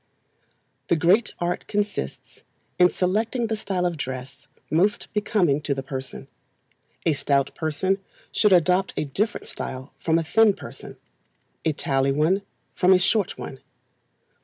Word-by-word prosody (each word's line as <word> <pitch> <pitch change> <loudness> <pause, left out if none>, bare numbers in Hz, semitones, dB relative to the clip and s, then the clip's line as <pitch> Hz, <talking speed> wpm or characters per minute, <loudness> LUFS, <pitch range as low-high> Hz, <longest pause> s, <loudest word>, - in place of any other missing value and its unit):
The - - +3
great 180 +8 +3
art 175 0 -2
consists 205 - -3 0.4
in 180 0 +7
selecting 220 +8 0
the 220 0 -1
style 190 -4 -2
of 175 -2 -1
dress 130 0 -6 0.2
most 190 +7 +1
becoming 205 -9 +2
to 145 -2 -1
the 135 - -4
person. 130 -2 -6 0.8
A 160 - +4
stout 140 -1 +1
person 180 +5 0 0.3
should 210 -1 +3
adopt 185 +1 +4
a - - 0
different 200 +11 -2
style 130 +1 -7
from 165 0 +2
a 165 - +1
thin 215 +6 +4
person; - - -10 0.7
a 160 - +2
taLl 135 -1 0
one 165 +7 +2 0.3
from 185 +1 +5
a - - +7
short 200 +2 +1
one. 135 - -7
175 Hz, 140 wpm, -24 LUFS, 140-200 Hz, 0.8 s, in